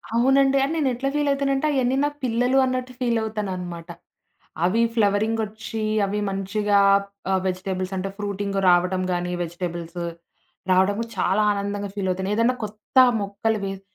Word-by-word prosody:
అవునండి. 270 +3 +4
అని 280 +4 -1
నేను 290 -4 +2
ఎట్లా 270 +3 -2
ఫీల్ 295 -1 +1
అయితానంటే 275 0 0
అయన్నీ 260 -2 +1
నా - - +1
పిల్లలు 245 +2 +1
అన్నట్టు 255 0 -2
ఫీలవుతాననమాట. 205 -8 -3 0.8
అవి 210 +6 +2
ఫ్లవరింగ్ 215 +1 +2
ఒచ్చి, 220 +1 -6 0.2
అవి 205 +1 -2
మంచిగా 200 +1 +1 0.5
ఆహ్, 190 -1 +2
వెజిటబుల్స్ 185 0 -3
అంటే, 190 +1 -3
ఫ్రూటింగ్ 200 -1 -3
రావటం 180 +1 +3
గానీ 175 0 -1
వెజిటబుల్స్. 175 0 -5 0.7
రావడము 195 +4 +3
చాలా 190 +2 +2
ఆనందంగా 200 0 -3
ఫీల్ 200 -2 -2
అవుతాను. 190 +2 -2
ఏదన్నా 230 +3 +2
కొత్త 215 +4 -8 0.2
మొక్కలు 205 +2 -1
వేస్ 195 0 -5
205 Hz, 140 wpm, -23 LUFS, 190-235 Hz, 0.8 s, అవునండి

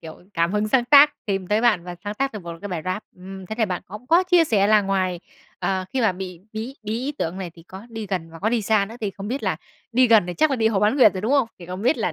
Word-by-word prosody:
kiểu, 160 -1 -10 0.2
cảm 170 +1 +1
hứng 210 0 0
sáng 245 +2 +3
tác, 290 +3 +7
tìm 195 -3 -2
tới 210 +3 +1
bạn 225 -8 +2
và 180 0 -6
sáng 205 0 -4
tác 275 +5 -1
được 210 -3 -7
một 170 0 -6
cái 205 - -5
bài 175 -4 -4
rap. 185 +3 -2
Ừm, 190 +1 -10
thế 220 - -5
thì 225 - +3
bạn 180 -4 -3
cũng 210 +6 -10
có 335 +6 +5
chia 360 -2 +4
sẻ 205 -9 +2
là 210 0 +5
ngoài, 185 -3 -1 0.4
ờ, 190 -1 -1
khi 265 - 0
mà 225 -5 +3
bị 180 -2 -7
bí 225 +5 -5
bí 215 0 -4
ý 270 +4 -3
tưởng 170 +3 -3
này, 185 -3 -5
thì 165 - -15
có 190 +5 -11
đi 225 -2 -6
gần 180 -4 -4
và 165 - -11
có 205 - 0
đi 230 -1 0
xa 210 0 +2
nữa. 220 - -10
Thì 210 -3 -2
không 195 +1 -8
biết 265 +4 -3
là 190 -6 0 0.4
đi 255 +2 +5
gần 225 -5 +5
thì 180 - -4
chắc 310 - +2
là 270 - +1
đi 220 -2 +2
hồ 205 -3 0
Bán 210 +6 +2
Nguyệt 230 -8 +6
rồi, 185 - -3
đúng 220 +7 -1
không? 275 -5 +3
Thì 175 - -11
không 185 +2 -6
biết 250 +7 +3
là - - -1
210 Hz, 315 wpm, -23 LUFS, 185-235 Hz, 0.4 s, tác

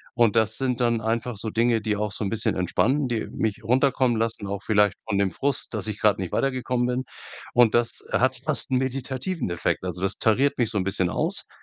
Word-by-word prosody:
Und 115 -2 +3
das 110 -1 +2
sind 125 -2 -1
dann 120 -1 +2
einfach 115 0 -2
so 110 +2 -4
Dinge, 115 0 +2
die 105 -1 -1
auch 105 0 -2
so 105 - -5
'n 100 - -1
bisschen 115 -1 0
entspannen, 130 - +1
die 120 -3 -2
mich 110 -2 -3
runterkommen 130 -1 +2
lassen, 115 -2 -2
auch 100 0 -4
vielleicht 105 -2 +2
von 100 -3 -1
dem 100 - +2
Frust, 135 +4 -1
dass 105 -2 0
ich 105 -1 -4
grad 105 -2 +3
nicht 90 -3 -4
weitergekommen 125 -2 -1
bin. 125 +1 -1 0.5
Und 120 -2 +4
das 120 0 +1
hat 130 +1 +2
fast 155 -3 +4
'n 130 - +3
meditativen 130 - -3
Effekt. 85 - -1
Also 90 - -5
das 95 - +1
tariert 130 +6 +2
mich 115 -2 +2
so 105 - -2
'n - - 0
bisschen 95 -2 +1
aus. - - -1
115 Hz, 220 wpm, -24 LUFS, 105-130 Hz, 0.5 s, Und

